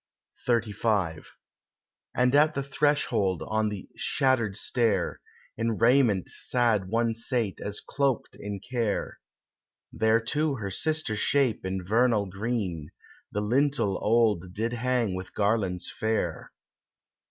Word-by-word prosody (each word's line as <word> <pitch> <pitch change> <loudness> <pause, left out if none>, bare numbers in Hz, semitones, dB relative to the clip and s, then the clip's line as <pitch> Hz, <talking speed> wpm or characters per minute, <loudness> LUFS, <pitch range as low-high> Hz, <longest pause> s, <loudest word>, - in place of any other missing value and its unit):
XXXV 105 -8 0 0.9
And 125 +1 +3
at 150 +2 +4
the 140 - -1
threshold, 140 - +1
on 110 0 0
the 105 -3 -7
shattered 120 -7 +1
stair, 115 -8 0 0.4
In 115 -1 -1
raiment 115 -5 +3
sad 115 -6 0
one 115 +1 +1
sate 115 -3 0
as 100 0 -2
cloaked 140 -4 -1
in 100 -1 -5
care; 115 -3 -2 0.7
There, 110 +1 +3
too, 145 +6 0
her 100 -5 -5
sister 155 - 0
shape 130 +1 +1
in 95 0 -3
vernal 110 0 +2
green, 95 -6 -3 0.4
The 105 - -2
lintel 125 -2 +1
old 105 -6 +2
did 115 +3 -1
hang 120 -3 0
with 95 0 -7
garlands 100 -4 0
fair. 110 0 -2
110 Hz, 120 wpm, -27 LUFS, 100-125 Hz, 0.9 s, at